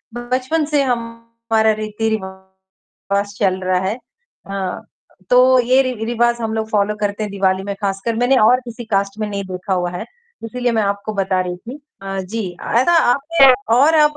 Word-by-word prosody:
बचपन 255 +6 -1
से 295 -1 +1
हमारा 230 -2 -1
रीति-रिवाज 200 -2 -5
चल 190 -2 +1
रहा 185 0 +1
है। 190 +3 -2 0.5
अ, 195 -2 -4 0.5
तो 255 +1 +6
ये 255 +2 +4
रि-रिवाज 240 -1 0
हम 220 -1 -2
लोग 220 0 -3
फॉलो 210 0 +1
करते 205 +1 -1
हैं 210 - -4
दिवाली 190 -1 0
में 200 0 -4
खासकर 200 +3 -2
मैंने 245 +3 +3
और 245 +4 +5
किसी 235 0 -8
कास्ट 200 -1 -1
में 215 - -1
नहीं 200 -1 -3
देखा 185 +1 -3
हुआ 175 -1 -1
है, 180 +5 -5 0.4
इसीलिए 245 +2 -2
मैं 220 -2 +1
आपको 200 +1 -2
बता 190 -2 0
रही 180 -1 -4
थी 245 +10 -10 0.2
अ, 195 0 -4
जी, 195 +1 -4
ऐसा 250 +9 +2 0.2
आप 280 - -3 0.6
और 295 +5 +5
आप 300 -1 +4
215 Hz, 170 wpm, -18 LUFS, 195-240 Hz, 0.6 s, तो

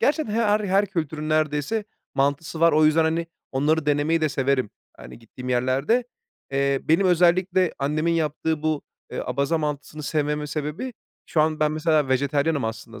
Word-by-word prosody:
gerçekten 295 -6 +1
her 215 -2 +2
her 200 0 +2
kültürün 155 -5 -3
neredeyse 155 +7 0 0.3
mantısı 145 +3 -1
var 170 0 +5
o 155 +1 +4
yüzden, 155 +1 +4
hani, 165 +1 0 0.3
onları 150 +3 +1
denemeyi 150 +3 +2
de 155 - +2
severim, 135 -4 0 0.3
hani, - - -11
gittiğim 125 +2 -10
yerlerde. 130 - +1 0.5
Eee, 140 0 +1
benim 165 +5 +3
özellikle 180 +1 +3
annemin 155 +4 0
yaptığı 160 -1 -1
bu, 155 -2 0 0.3
eee, - - -3
Abaza 140 +6 0
mantısını 150 0 -4
sevmemin 150 0 -1
sebebi, 150 - -4 0.3
şu 155 - +1
an 155 0 +1
ben 150 0 +2
mesela 155 -2 +1
vejetaryenim 140 +2 +1
aslında 115 +1 -6
155 Hz, 155 wpm, -24 LUFS, 140-165 Hz, 0.5 s, var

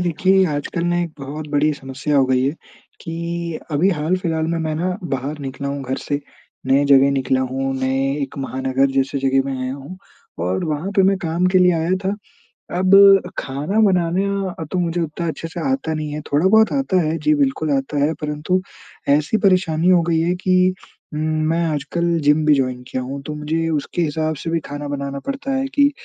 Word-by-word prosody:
देखिए 185 +3 +3
आजकल 155 +2 -3
ना 175 0 +1
एक 170 - -4
बहुत 145 +3 -6
बड़ी 150 +1 +2
समस्या 140 +2 -3
हो 135 - +5
गई 130 -1 +2
है 135 - +2 0.5
कि 170 0 -4
अभी 155 +6 +2
हाल-फिलहाल 165 0 -1
में 165 +1 -1
मैं 160 -1 -2
ना 180 +3 -1 0.2
बाहर 140 +4 -4
निकला 140 0 -5
हूँ 140 0 -4
घर 130 0 -3
से, 145 0 -3 0.5
नए 135 +2 +3
जगह 140 -1 +5
निकला 130 -1 +1
हूँ, 135 +1 -2
नए 135 +1 0
एक 135 - -6
महानगर 130 0 0
जैसे 135 +1 0
जगह 135 0 +2
में 135 -1 -3
आया 130 0 -3
हूँ 140 +6 -9 0.5
और 95 +1 -1
वहाँ 155 +4 -2
पे 195 - +6
मैं 195 +1 +3
काम 170 0 0
के 185 - +5
लिए 180 0 +5
आया 165 +1 -1
था। 190 - +1 0.7
अब 195 +1 +7 0.2
खाना 145 +10 -2
बनाना 195 0 +1
अ, - - -3
तो 185 - 0
मुझे 175 0 -1
उतना 165 +1 -3
अच्छे 165 +1 -4
से 165 - -7
आता 265 -12 -1
नहीं 155 -1 -4
है, 150 - -4
थोड़ा-बहुत 190 +11 +3
आता 270 -10 +1
है। 160 0 -1
जी, 150 0 +2
बिल्कुल 145 +2 0
आता 135 +2 -2
है 155 +2 +2
परंतु 150 +5 -1 0.5
ऐसी 150 +8 +3
परेशानी 180 -3 +3
हो 180 -2 +5
गई 165 -1 +2
है 170 +2 +1
कि 185 0 +2 0.4
उम, 150 - -3
मैं 155 +2 0
आजकल 165 +3 -1
जिम 150 +2 +4
भी 150 - +6
जॉइन 130 -2 -1
किया 130 - -3
हूँ। 135 +2 -6
तो 150 - -3
मुझे 160 +2 -2
उसके 155 +2 -2
हिसाब 155 0 -1
से 165 - -3
भी 165 0 +1
खाना 145 0 -5
बनाना 140 -1 -4
पड़ता 275 0 -3
है 265 0 0
कि 285 0 +5
155 Hz, 200 wpm, -20 LUFS, 140-175 Hz, 0.7 s, अब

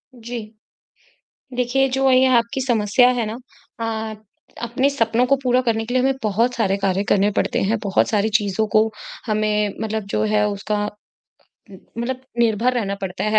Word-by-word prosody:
जी। 235 0 -6 1.2
देखिए 250 +2 +2
जो 265 +1 +2
ये 255 +1 +5
आपकी 235 +3 -1
समस्या 240 0 +3
है 225 - 0
न - - -7 0.4
अ 220 -1 -3 0.5
अपने 245 +4 +1
सपनों 235 -3 +1
को 275 - +4
पूरा 250 0 +3
करने 225 -3 0
के 245 - -5
लिए 255 - +3
हमें 270 +1 +2
बहुत 225 +4 +1
सारे 195 -4 +1
कार्य 195 0 0
करने 205 +1 +3
पड़ते - - 0
हैं। 215 +4 +1
बहुत 195 -1 +2
सारी 215 0 +1
चीज़ों 210 0 -1
को 215 - +7 0.4
हमें 210 -2 0
मतलब 220 -1 -2
जो 215 - +1
है 210 -1 +2
उसका 205 +1 -2 0.9
उम, 190 - -12 0.2
मतलब 255 +2 -3 0.2
निर्भर 235 +1 +2
रहना 205 -5 -1
पड़ता 190 -1 -4
है 215 0 +3
225 Hz, 170 wpm, -21 LUFS, 210-245 Hz, 1.2 s, को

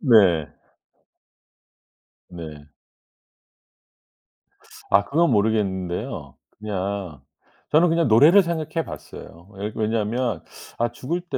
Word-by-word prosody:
네. 100 - +4 1.7
네. 80 -4 -9 2.2
아 100 +1 +4
그건 165 0 +2
모르겠는데요. 100 -5 -1 0.2
그냥 100 -7 -4 0.5
저는 165 +3 +5
그냥 165 -1 +2
노래를 150 - +7
생각해 165 -1 -3
봤어요. 85 +4 -11
왜 100 +2 -5
왜냐면 115 +3 -1 0.3
'아 120 0 0
죽을 160 +9 -4
때 170 -7 -4
110 Hz, 180 characters per minute, -23 LUFS, 95-150 Hz, 2.2 s, 노래를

